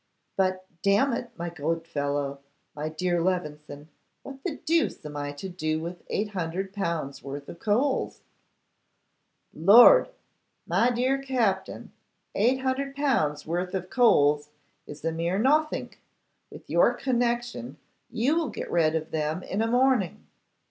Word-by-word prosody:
'But, 185 -1 0 0.2
damn 205 +7 +3
it, 240 +1 -3
my 170 0 -4
good 165 0 -2
fellow, 145 -3 -2 0.4
my 150 +1 -3
dear 175 +2 -1
Levison, 150 -4 -3 0.3
what 275 -1 -10
the 340 -6 -2
deuce 325 - 0
am 150 -1 -7
I 145 0 -3
to 145 +7 -7
do 155 -4 -2
with 170 +2 -7
800L. 180 -6 -3
worth 140 +1 -7
of 170 - -10
coals?' 245 +8 0 1.3
'Lord! 230 - +7 0.6
My 240 - +2
dear 255 +3 0
Captin, 235 -8 -1 0.4
800L. 260 - 0
worth 180 +3 -2
of 185 -1 -4
coals 150 - +4 0.4
is 150 +1 -9
a 165 - +1
mere 170 +3 -1
nothink. 300 +7 +1 0.5
With - - -13
your - - +3
connection, 240 - -1 0.3
you 250 +6 +1
will 330 -2 0
get - - -6
rid 165 -2 +2
of 160 0 -3
them 155 +3 -2
in 200 - -2
a 225 - +1
morning. 245 -5 +1
185 Hz, 130 wpm, -26 LUFS, 155-245 Hz, 1.3 s, Lord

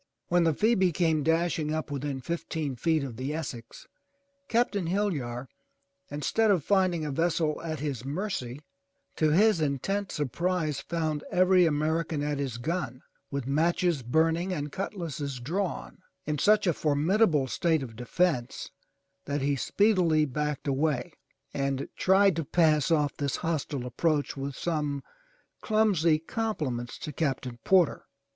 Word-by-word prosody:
When 175 -1 +3
the 165 - +3
Phoebe 210 -3 +3
came 160 -2 +1
dashing 165 0 +1
up 155 -1 -3
within 140 -1 -3
fifteen 160 -2 -3
feet 155 +4 +1
of 125 -5 -6
the 135 +4 -3
Essex, 125 -7 -7 0.6
Captain 225 -6 +1
Hillyar, 145 -11 -1 0.6
instead 180 +10 +1
of 185 -7 +3
finding 185 -5 +2
a 150 - -2
vessel 160 0 0
at 160 -2 -4
his 140 -6 -3
mercy, 145 - -4 0.6
to 155 - +3
his 195 +2 +4
intense 180 +8 -1
surprise, 155 +1 -1
found 155 -2 -2
every 185 -1 +5
American 155 0 0
at 145 -1 -1
his 135 -4 -3
gun, 130 -2 -3 0.3
with 140 -2 -3
matches 165 +2 +1
burning 165 +8 +1
and 150 -4 -3
cutlasses 155 -9 -4
drawn, 175 +9 -3 0.3
in 150 -1 -2
such 215 0 +4
a 175 - +3
formidable 155 +2 +2
state 160 +3 +1
of 115 -4 -8
defence 125 +1 -1 0.5
that 145 -1 -2
he 140 0 +2
speedily 175 -1 +3
backed 150 +1 -3
away, 140 -2 0 0.4
and 140 -1 -2
tried 190 -1 +4
to 165 - 0
pass 155 -1 +3
off 150 -3 +1
his 140 -1 -1
hostile 145 -5 -2
approach 145 +4 0
with 140 0 -5
some 150 -4 -2 0.6
clumsy 200 -8 +3
compliments 155 - -3
to 150 - -6
Captain 130 -5 -2
Porter. 185 -5 +3
155 Hz, 140 wpm, -28 LUFS, 140-175 Hz, 0.6 s, every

